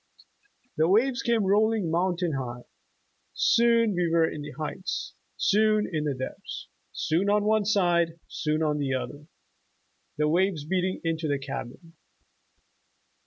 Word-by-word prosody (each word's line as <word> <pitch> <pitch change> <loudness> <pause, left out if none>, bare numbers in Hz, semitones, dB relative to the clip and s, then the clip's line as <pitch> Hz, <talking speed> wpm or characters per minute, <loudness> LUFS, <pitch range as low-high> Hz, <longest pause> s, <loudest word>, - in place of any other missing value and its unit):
The 160 +1 +3
waves 245 +6 +3
came 235 -3 +1
rolling 205 -2 +2
mountain 175 -1 0
high; 120 -2 -4 0.7
soon 230 -2 +3
we 175 -2 0
were 165 -1 +4
in 150 - -5
the 145 - -7
heights; 155 +4 -4 0.2
soon 215 0 +3
in 155 -1 -1
the 145 -2 -1
depths; 130 0 -7 0.2
soon 175 +6 0
on 210 0 +3
one 215 0 +2
side; 175 -5 +2
soon 155 0 -1
on 150 -1 0
the 135 -2 0
other, 145 +3 -6 0.9
the 150 0 +2
waves 170 -1 +1
beating 185 +2 -1
into 165 -1 -1
the 145 -1 +1
cabin." 135 +4 -7
170 Hz, 135 wpm, -27 LUFS, 150-205 Hz, 0.9 s, were